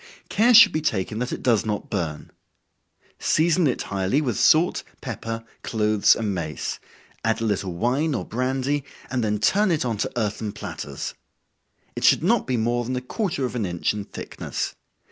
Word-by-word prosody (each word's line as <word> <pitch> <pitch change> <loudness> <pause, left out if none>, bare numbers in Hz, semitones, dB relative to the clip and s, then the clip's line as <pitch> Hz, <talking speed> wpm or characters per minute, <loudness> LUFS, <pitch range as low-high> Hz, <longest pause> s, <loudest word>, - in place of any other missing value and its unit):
Care 235 +3 +4
should 230 -1 +10
be 155 - -1
taken 110 -5 -1
that 125 +1 -2
it - - -5
does 115 -4 +3
not 105 -2 -3
burn. 80 -7 -3 0.9
Season 165 +1 +3
it 125 - -1
highly 100 +7 0
with 130 -7 -1
salt, 165 +3 +4 0.2
pepper, 115 0 -5 0.2
cloves 105 -2 +3
and 110 -3 -2
mace 80 -4 -4 0.4
add 115 0 +1
a - - -3
little 100 -4 -1
wine 135 - +1
or - - -3
brandy, 130 +4 -1 0.3
and 125 -2 0
then 105 -1 +1
turn 200 - +3
it 160 -6 +1
on 115 -3 -1
to 105 - -2
earthen 105 -1 -2
platters. - - -6 0.8
It - - -4
should - - +5
not 225 +5 +2
be 130 -2 0
more 120 +2 0
than 125 +2 -3
a 125 - -2
quarter 145 - -2
of 125 - -4
an 115 - -1
inch 85 0 -1
in 105 -1 -5
thickness. - - -5
120 Hz, 180 wpm, -24 LUFS, 105-145 Hz, 0.9 s, should